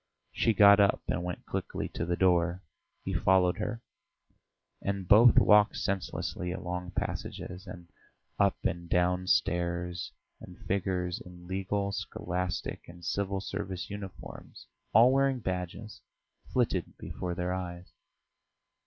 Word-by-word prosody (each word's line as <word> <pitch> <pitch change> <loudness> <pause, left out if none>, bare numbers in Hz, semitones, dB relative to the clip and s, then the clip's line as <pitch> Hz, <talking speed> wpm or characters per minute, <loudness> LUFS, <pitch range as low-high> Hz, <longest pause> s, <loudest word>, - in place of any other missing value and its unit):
She 115 - +1
got 100 0 +8
up 100 -1 +3
and 90 - -1
went 90 0 -5
quickly - - -3
to 80 - -4
the 85 - +1
door; 90 0 +2 0.4
he - - -2
followed 90 -1 +3
her, 115 +1 -3 1.0
and 100 -2 -3
both 110 +4 +7
walked 105 0 +6
senselessly 95 -2 -3
along 90 0 -5
passages, 90 +3 -4
and 90 -1 -9 0.5
up - - +3
and 85 0 -2
down 90 +1 +1
stairs, 85 +1 0 0.3
and 90 0 -12
figures 90 -2 -1
in 90 -1 -13
legal, 95 +2 -2
scholastic, 90 -3 -4
and 85 -1 -12
civil 100 0 -1
service 95 -2 -5
uniforms, 100 -2 -9 0.3
all 115 +4 +7
wearing 135 -1 +2
badges, 95 +2 -5 0.5
flitted - - 0
before 90 -1 -5
their 90 0 -2
eyes. 90 -1 -6
90 Hz, 125 wpm, -30 LUFS, 90-100 Hz, 1.0 s, got